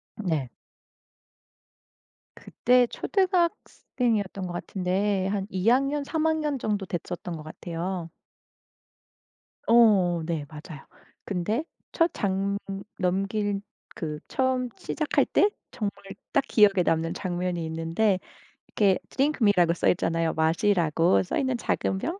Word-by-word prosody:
네. 160 - -2 1.9
그때 250 0 +2
초등학생이었던 250 - -1
것 175 - -6
같은데 190 +2 -1
한 195 -1 -1
2 190 +3 +1
학년, 275 +3 +2
3 320 +2 -1
학년 305 -3 +1
정도 205 -3 -1
됐었던 175 0 -5
것 155 - -9
같아요. 170 +2 -5 1.6
어 200 -8 +5
네 160 -4 -2
맞아요. 150 -2 -10 0.4
근데 210 - -1 0.3
첫 335 0 +3
장 200 0 -1 0.4
넘길 195 +2 0 0.3
그 155 -6 -4
처음 260 -1 0
시작할 305 -2 0
때 410 - +3 0.2
정말 210 -5 -2 0.4
딱 - - +3
기억에 200 -4 +5
남는 165 +1 +1
장면이 180 -2 -2
있는데 165 +5 0 0.5
이렇게' 195 -3 +2
Drink 285 +1 0
me 205 -2 +6
'라고 170 -1 +4
써 - - 0
있잖아요. 165 -2 +1
마시라고 165 0 +2
써 - - -3
있는 260 -3 0
작은 190 - -1
병? 345 - -3
195 Hz, 235 characters per minute, -26 LUFS, 175-240 Hz, 1.9 s, me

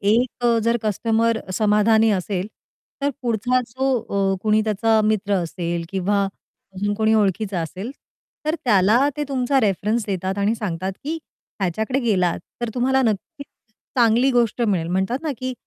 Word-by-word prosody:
एक 235 +4 +1
अ, 235 -1 +4
जर 235 +1 +3
कस्टमर 225 +2 +1 0.2
समाधानी 220 +2 +4
असेल, 190 -1 -1 0.6
तर 285 - +2
पुढचा 245 +2 +1
जो 265 +3 -1 0.4
अ, - - -4
कुणी 215 0 +3
त्याचा 220 +1 +2
मित्र 210 -1 +1
असेल 170 -1 -2
किंवा 195 +1 0 0.5
अजून 205 +2 -1
कोणी 220 +1 +2
ओळखीचा 200 -2 +1
असेल, 185 +8 -5 0.5
तर 310 +1 +1
त्याला 220 +4 +4
ते 295 - -1
तुमचा 270 0 +1
रेफरन्स 215 +2 0
देतात 190 0 -2
आणि 205 +3 +2
सांगतात 190 -4 -3
की 320 +3 -2 0.4
"ह्याच्याकडे 215 +8 0
गेलात 185 -8 +1 0.2
तर 240 - -1
तुम्हाला 265 +2 +2
नक्कीच 225 +5 -2 0.5
चांगली 240 +3 +4
गोष्ट 240 -2 +1
मिळेल." 185 -7 +1
म्हणतात 190 +8 0
ना 315 - -1
की 255 0 -3
220 Hz, 150 wpm, -22 LUFS, 195-240 Hz, 0.6 s, अ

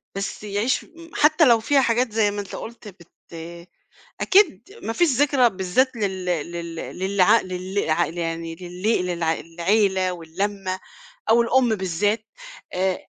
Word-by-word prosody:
بس 195 +1 -4
يعيش 210 +5 0
م 335 0 -15
حتى 310 +2 +5
لو 235 -4 +5
فيها 275 +5 +3
حاجات 240 -1 +1
زي 210 -1 +2
ما 205 0 -3
أنت 200 - -8
قُلت 235 -1 -9
بت 175 -4 -14 1.1
أكيد 380 -3 +4 0.2
ما 225 - -2
فيش 345 +8 +3
ذكرى 275 -3 +4
بالذات 195 +7 0
لل 190 -4 -2
لل 170 -1 -3 0.2
للع 190 +3 +4
لل 185 0 -3
ع 170 +2 +2
يعني 165 0 -4
لل 180 +3 -1
للع 170 -2 0
للعيلة 185 +3 +1
واللمّة 185 +3 -3 0.5
أو 235 +1 +6
الأم 240 -1 +3
بالذات 205 +3 -1 0.5
آآ 185 0 -1
195 Hz, 140 wpm, -23 LUFS, 180-230 Hz, 1.1 s, أو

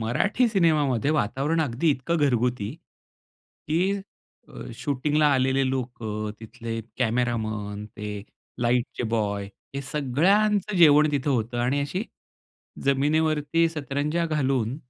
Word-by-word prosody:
मराठी 205 - +1
सिनेमामध्ये 150 - +2
वातावरण 150 +4 0
अगदी 150 +3 +1
इतकं 140 +5 -1
घरगुती, 125 -6 +1 1.0
की 180 +5 +2 0.5
अ, - - -9
शूटिंगला 150 +3 +1
आलेले 130 0 +2
लोकं, 110 -5 -3
तिथले 115 +1 -6 0.2
कॅमेरामन, 110 -4 -1
ते 105 -1 -7 0.4
लाईटचे 120 +1 0
बॉय 100 -3 0 0.3
हे 140 - -2
सगळ्यांचं 190 +10 +1
जेवण 150 -2 +6
तिथं 145 0 0
होतं. 120 -2 -1
आणि 125 +4 +1
अशी 180 +9 -2 0.8
जमिनीवरती 155 +3 +2
सतरंजा 150 +2 -2
घालून, 135 -5 0
135 Hz, 105 wpm, -25 LUFS, 120-155 Hz, 1.0 s, जेवण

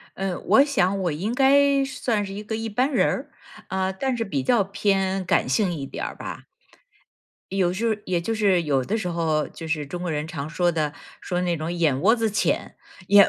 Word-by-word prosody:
嗯， 190 -2 -3
我 275 - +6
想 195 -9 +1
我 175 - +1
应 190 +10 -2
该 275 +1 +4
算 230 -5 -1
是 195 - -7
一 205 +2 -6
个 220 +1 -4
一 225 0 -3
般 250 +7 0
人 - - +3
儿， - - -2 0.4
啊， 190 0 0
但 255 +7 -2
是 230 -1 -2
比 145 -9 -2
较 220 - +3
偏 195 -1 0
感 170 - +2
性 180 +9 +1
一 145 -4 -4
点 - - -5
儿 - - -5
吧。 - - -7 1.1
有 180 -2 +3
时 215 +5 -2
候 225 - +3
也 175 -2 0
就 225 +7 -2
是 200 -5 +3
有 140 -4 +1
的 210 - -1
时 190 -5 -2
候， 160 -3 0
就 165 - -9
是 155 -2 -1
中 175 +5 -6
国 180 - -2
人 150 -1 -2
常 155 -3 -5
说 175 +2 +1
的， 155 -3 -1 0.3
说 180 0 -2
那 175 -2 0
种 160 +2 -3
眼 160 -6 +1
窝 220 +5 +5
子 225 -2 0
浅， 200 - 0 0.3
眼 200 0 +8
190 Hz, 235 characters per minute, -24 LUFS, 165-220 Hz, 1.1 s, 眼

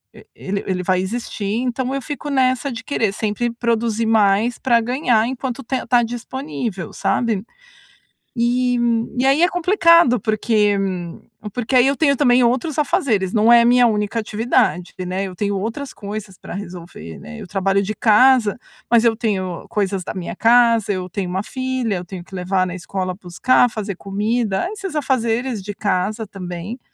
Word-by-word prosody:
e - - -15
ele 195 +1 -4
ele 185 -1 -2
vai 185 0 +1
existir, 205 +1 -4 0.2
então, 255 +1 -2
eu 275 - -2
fico 290 +1 -6
nessa 260 0 +1
de 235 +2 -7
querer 225 -7 0
sempre 220 +3 -2
produzir 230 -1 -1
mais 220 +2 +3
para 235 -2 +2
ganhar 240 -2 +1
enquanto 260 0 -4
tem 260 +2 -3
tá 245 -1 +3
disponível, 240 - -5
sabe? 220 -5 -1 0.9
E 245 +1 +1 0.4
e 255 - +2
aí 280 +5 +4
é 350 - +5
complicado, 335 - +4
porque, 215 -2 +1
hum, 180 -3 -4 0.3
porque 245 +3 -1
aí 250 - +6
eu 275 - +2
tenho 280 -3 +3
também 250 -2 +4
outros 260 +6 0
afazeres, 250 - 0
não 220 +2 +5
é 235 0 +7
minha 245 0 +5
única 210 0 0
atividade, 215 -4 0
né, 185 +2 -2
eu 185 -2 -7
tenho 200 +1 -1
outras 230 +8 -4
coisas 205 -2 -7
pra - - -9
resolver, 175 - -8
né, 230 - -10
eu 205 - -8
trabalho 195 +1 +1
de 215 +2 -3
casa, 235 +1 +4 0.3
mas 235 0 +5
eu 230 - +4
tenho 190 -6 -3
coisas 195 -2 -1
da - - -6
minha 180 -2 -5
casa, 230 -2 +4
eu 185 -2 -3
tenho 185 0 -4
1 190 +2 -1
filha, 260 -5 -2
eu 180 - -5
tenho 180 0 -8
que 190 - -14
levar 185 0 0
na 180 - -5
escola, 185 0 -4
buscar, 195 +8 +2
fazer 205 -3 -4
comida, 210 - -1
esses 390 -6 -6
afazeres 245 -4 0
de 205 +2 -6
casa, 210 +2 -1
também, 185 +4 -7
225 Hz, 170 wpm, -20 LUFS, 195-250 Hz, 0.9 s, é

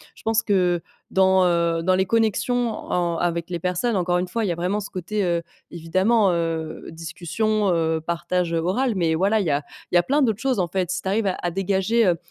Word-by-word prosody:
Je - - -16
pense 225 0 +1
que 180 -5 +2 0.3
dans, 190 0 +4
heu, 170 -1 +1
dans 185 +2 +2
les 190 +1 +2
connexions 230 +3 +1
en 175 -5 -2
avec 170 0 -1
les 175 - -2
personnes 180 +7 -1
encore 180 -1 +1
une 180 - -2
fois, 225 +5 -2
il - - -1
y - - +1
a - - -2
vraiment 180 +5 -1
ce 200 - -7
côté, 195 +3 -2
heu, 170 -1 0 0.3
évidemment, 185 +5 +2
heu, 165 -2 -3
discussion, 180 +6 -1
heu, 160 -1 +1
partage, 170 +1 -2
heu, 165 - +1
oral. 220 +9 0
Mais 165 -3 +1
voilà 200 +6 +2
il 200 - -1
y - - +1
a 145 +1 0 0.3
il - - 0
y - - +8
a 175 - +4
plein 285 +10 +1
d'autres 220 -6 +1
choses 260 -2 0
en 180 - +1
fait, 185 0 -2
si 190 +1 -2
tu - - -6
arrives 210 +2 +1
à 190 - 0
à 175 - -1
dégager, 195 +5 +1
heu, 175 -3 +3
185 Hz, 240 wpm, -23 LUFS, 170-210 Hz, 0.3 s, y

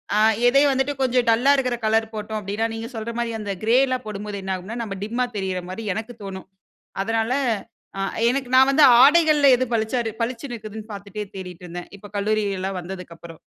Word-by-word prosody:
ஆ - - +3 0.3
எதயும் 275 +3 +5
வந்துட்டு 265 +2 0
கொஞ்சம் 250 -1 +2
டல்லா 240 +5 +4
இருக்கிற 250 -2 0
கலர் 225 0 +1
போட்டோம் 215 0 -4
அப்படின்னா, 210 +3 -2
நீங்க 225 +1 -6
சொல்ற 225 +1 -4
மாதிரி, 235 -1 -2
அந்த 205 -2 -3
கிரே 230 +3 +4
எல்லாம் 255 -2 -2
போடும்போது, 205 -1 -5
என்ன 190 0 -2
ஆகும்ன்னா, 200 +6 -7
"நம்ம 200 -3 -5
டிம்மா 240 +4 -1
தெரிற 190 -2 -2
மாதிரி" 215 +4 -6
எனக்கு 225 +2 -6
தோணும். 190 -1 -7 0.6
அதனால, 225 +2 -1 0.7
அ - - -1 0.3
எனக்கு 255 0 -2
நான் 265 +1 +6
வந்து 290 +2 +6 0.2
ஆடைகள்ல, 300 -1 +6
எது 255 - 0
பளிச்சா 225 +2 0 0.2
பளிச்சுனு 245 +2 -4
இருக்குதுன்னு 215 0 -9
பார்த்துட்டே 200 +1 -6
தேடிட்டு 180 -1 -8
இருந்தேன். 175 +1 -8
இப்போ 205 +1 -13
கல்லூரிலாம் 200 -2 -1
வந்ததுக்கப்புறம். 170 -2 -9
220 Hz, 175 wpm, -23 LUFS, 195-245 Hz, 0.7 s, நான்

